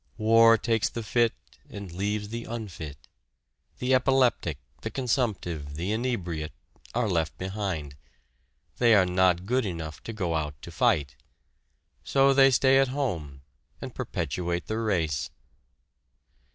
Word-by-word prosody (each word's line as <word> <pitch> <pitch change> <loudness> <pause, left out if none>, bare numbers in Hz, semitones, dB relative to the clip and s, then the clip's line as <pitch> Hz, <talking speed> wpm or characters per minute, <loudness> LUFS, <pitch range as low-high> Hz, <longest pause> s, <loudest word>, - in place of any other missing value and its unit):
War 115 +1 +6
takes 110 0 +1
the 115 - -5
fit 115 +1 +2 0.3
and 100 -3 -8
leaves 105 +3 -2
the 115 +1 -5
unfit. 90 -11 -6 0.8
The 125 +1 0
epileptic, 130 - +2 0.2
the - - -3
consumptive, 100 - -2
the 90 +6 -2
inebriate, 95 -10 -2 0.4
are 120 -2 +1
left 80 -5 -1
behind. 95 -7 -4 0.8
They 120 -2 +6
are 95 -3 +5
not 90 0 +2
good 125 +4 +1
enough 85 -6 -5
to - - -4
go 95 -7 -2
out 75 -3 -3
to - - -8
fight. 70 -3 +1 0.9
So 135 0 +4
they 135 0 +7
stay 135 +1 +4
at 135 - +4
home, 85 - -3 0.4
and - - -7
perpetuate 85 +2 -3
the 110 +1 -2
race! 85 -10 0
100 Hz, 130 wpm, -27 LUFS, 85-120 Hz, 0.9 s, they